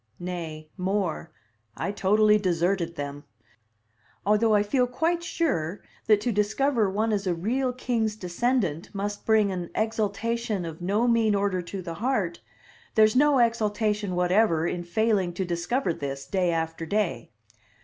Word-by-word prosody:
Nay, 165 -3 -5
more; 185 -2 -1 0.5
I 200 - -2
totally 210 +2 +3
deserted 175 -2 0
them. 145 0 -5 1.0
Although 215 +2 +3
I 205 - +4
feel 250 +4 +1
quite 330 +7 0
sure 205 - -2 0.2
that 215 -2 +5
to 240 - 0
discover 215 +2 +1
one 215 +3 0
is 200 -2 -1
a 175 - +1
real 250 +9 0
king's 235 -4 -1
descendant 185 - -1
must 205 +1 -4
bring 215 -3 +4
an 180 -2 -4
exultation 220 -1 -1
of 165 0 -7
no 205 +7 +1
mean 225 -3 +3
order 200 -2 0
to 185 +2 -7
the 170 -1 -5
heart, 210 -9 -1 0.5
there's 215 0 +5
no 290 +1 +5
exultation 210 -4 +1
whatever 180 -2 +2
in 175 0 -2
failing 195 -1 +1
to 185 +2 -2
discover 175 +5 -1
this, 135 -2 -5
day 185 -3 0
after 165 0 -2
day. 200 - -1
205 Hz, 145 wpm, -26 LUFS, 175-225 Hz, 1.0 s, that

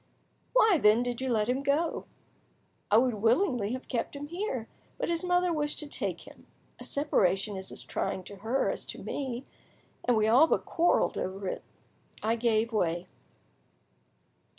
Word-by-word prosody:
"Why, 435 -8 +5
then, 215 +3 +5
did 245 0 -3
you 260 - -1
let 215 -3 +1
him 255 +2 0
go?" 290 +4 0 0.8
"I 210 - +6
would 250 +1 +3
willingly 230 - +2
have 255 - -6
kept 245 +2 -2
him 290 +1 -6
here, 335 - -3 0.3
but - - -2
his 335 0 0
mother 360 -1 +2
wished 295 -1 -1
to 300 - -5
take - - -3
him. - - -15 0.3
A - - -8
separation 205 -8 +1
is 190 0 -6
as - - -8
trying 195 -1 -3
to 200 +2 -10
her 225 +7 0
as - - -6
to - - -7
me, 260 -3 -4 0.6
and 245 -2 +3
we 215 0 +3
all 255 +8 +6
but - - +1
quarrelled 345 +1 +2
over 190 +1 -4
it. - - -3 0.6
I 225 +2 +2
gave 230 -1 +1
way." 175 -4 0
245 Hz, 170 wpm, -29 LUFS, 215-295 Hz, 0.8 s, I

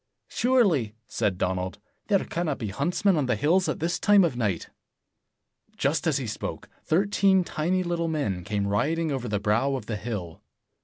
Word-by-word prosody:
"Surely, 190 - +2
" 115 - -50
said 105 -5 -1
Donald, 90 0 -2 0.3
"there 200 -3 +2
cannot 165 -4 -2
be 110 -5 -4
huntsmen 180 - +1
on 140 -4 0
the 125 - +2
hills 170 - +2
at - - -2
this 170 +1 -1
time 205 -1 +5
of 165 -7 +1
night." 105 -8 -2 1.1
Just - - 0
as - - +2
he - - -3
spoke, - - -5 0.2
thirteen 195 +1 +3
tiny 175 +3 -1
little 170 -1 -1
men 135 - -2
came 100 +1 -1
riding 155 +11 0
over 130 -3 -3
the 105 -2 -1
brow 115 +7 +1
of 125 -5 -5
the 110 -1 -3
hill. 100 -7 -5
140 Hz, 175 wpm, -26 LUFS, 105-175 Hz, 1.1 s, time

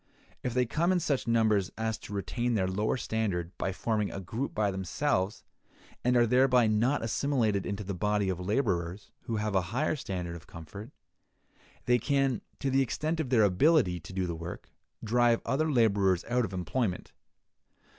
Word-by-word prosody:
If 125 -1 -3
they 125 0 +3
come 165 +9 +1
in 185 - +3
such 145 -7 -1
numbers 110 -4 +2
as 110 0 -2
to - - -11
retain 120 +5 -1
their 95 -3 +1
lower 105 +6 0
standard 100 -7 -2
by 95 - -1
forming 105 +1 -1
a - - -5
group 110 +9 -4
by 105 -2 +1
themselves, 95 +2 -1 0.6
and 125 0 +3
are 120 - +5
thereby 125 0 +4
not 115 +6 +2
assimilated 115 -4 0
into 100 +1 -3
the 100 0 -4
body 105 +2 0
of 95 -2 -1
laborers 95 -3 -1
who 115 - -2
have 105 -1 -1
a 95 - +3
higher 145 +8 0
standard 90 - -4
of 85 - -12
comfort, 90 +8 -9 1.0
they 125 0 +3
can, 135 -1 +1 0.2
to 135 - -1
the 135 +1 +3
extent 155 +5 -1
of 150 -5 -2
their 120 -4 +4
ability 100 - +3
to 90 - -11
do 90 -2 -2
work, 85 +2 -8 0.3
drive 120 +1 +3
other 155 +3 +1
laborers 100 -7 +3
out 120 0 +1
of 100 - -7
employment. 95 +2 -2
110 Hz, 175 wpm, -29 LUFS, 95-125 Hz, 1.0 s, are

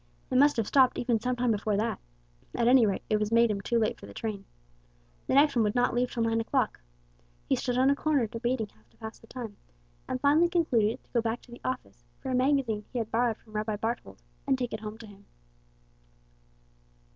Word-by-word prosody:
It - - +3
must 290 -1 +5
have 225 - +2
been - - -11
stopped 260 -2 +4
even 240 -2 +1
some 250 +2 -1
time 245 -1 +1
before 210 -1 0
that. 220 +3 -1 0.6
At 235 -1 +2
any 245 -2 +6
rate 195 - -2
it 215 - +1
had 210 +1 -1
made 230 -1 +5
him 200 -1 -2
too 235 - 0
late 220 -2 0
for - - -11
the 100 - -12
train. 205 -3 -4 0.8
The - - +1
next 285 0 +5
one 235 - +3
would 210 +1 +1
not 245 0 +2
leave 245 +1 +1
till 230 - -1
nine 225 0 +1
o'clock. 225 - -1 0.7
He - - +3
stood 245 -1 -2
on 265 +2 +5
a - - +2
corner 285 -4 +1
debating 230 0 -2
how 110 - -27
to - - -30
pass 220 -1 -8
the 225 - -18
time, 230 -5 -7 0.5
and 255 - -2
finally 300 +5 +4
concluded 245 - +1
to - - -33
go 235 - +3
back 225 +1 -2
to 245 - -18
the 240 - -11
office 120 - -5 0.2
for 265 - -5
a - - +1
magazine 255 -5 +1
he 255 - -4
had 225 -2 -2
borrowed 230 -1 +1
from 215 - -20
Rabbi 215 0 -1
Barthold, 230 +3 -4 0.3
and 270 -1 +3
take 245 -2 -3
it 215 - -3
home 215 0 -7
to 230 - -11
him. 200 -1 -16
235 Hz, 230 wpm, -29 LUFS, 215-255 Hz, 0.8 s, any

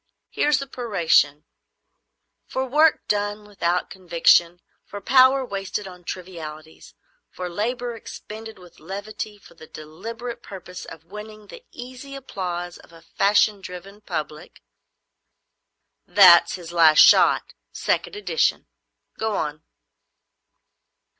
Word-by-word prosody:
Here's 295 -2 +2
the 275 - -4
peroration: 180 - +1 1.0
"For 265 - -2
work 300 +4 +3
done 205 0 -1
without 180 -4 -2
conviction, 175 -1 +3 0.2
for 205 - -9
power 260 +4 +4
wasted 195 -1 -4
on 180 -1 -13
trivialities, 160 -4 -9 0.3
for 180 - -6
labour 240 +6 -3
expended 220 0 -10
with 180 -2 -17
levity 205 +4 -7
for 200 - -18
the 160 -1 -14
deliberate 225 +10 -8
purpose 180 -2 -10
of 165 -1 -11
winning 210 +3 -10
the 470 - -13
easy 255 +3 -10
applause 175 -9 -5
of - - -18
a 165 -1 -16
fashion 205 +3 +2
driven 190 +3 -10
public——" 155 -3 -6 1.4
"That's 180 -4 +7
"His 175 -2 -10
Last 160 -2 +5
Shot," - - +5 0.2
second - - -2
edition. 440 +3 0 0.5
Go 220 -1 -1
on." 150 -2 -3
195 Hz, 115 wpm, -23 LUFS, 170-225 Hz, 1.4 s, That's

